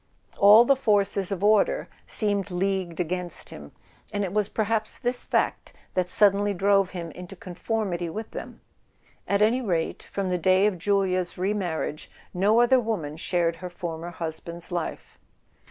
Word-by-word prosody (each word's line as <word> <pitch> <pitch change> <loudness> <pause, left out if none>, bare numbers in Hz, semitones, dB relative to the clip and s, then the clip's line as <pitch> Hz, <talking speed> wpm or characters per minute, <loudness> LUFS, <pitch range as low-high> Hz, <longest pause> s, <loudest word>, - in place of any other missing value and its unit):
All 210 +4 +8
the 275 - +4
forces 205 -6 +1
of 195 0 -3
order 210 0 +3 0.2
seemed 205 -2 +2
leagued 185 -2 -2
against 180 0 -3
him; 70 -1 -10 0.4
and 205 0 -1
it 185 -1 -3
was 210 -1 +1
perhaps 220 0 -1
this 245 -1 0
fact - - -1 0.2
that 180 -1 0
suddenly 205 0 +3
drove 195 0 +3
him 170 -3 -6
into 180 +4 -10
conformity 180 -1 -3
with 220 +6 -6
them. - - -8 0.7
At 200 +1 +2
any 235 +4 +2
rate, 170 -8 -1
from 195 -2 -4
the 180 - 0
day 185 +3 +4
of 200 -4 0
Julia's 185 -1 0
remarriage 180 -5 -2 0.2
no 205 +6 +3
other 255 +2 +5
woman 200 -11 -3
shared 170 0 0
her 180 +1 -7
former 170 -1 -6
husband's 170 0 -6
life. 175 -2 -5
190 Hz, 155 wpm, -25 LUFS, 175-210 Hz, 0.7 s, All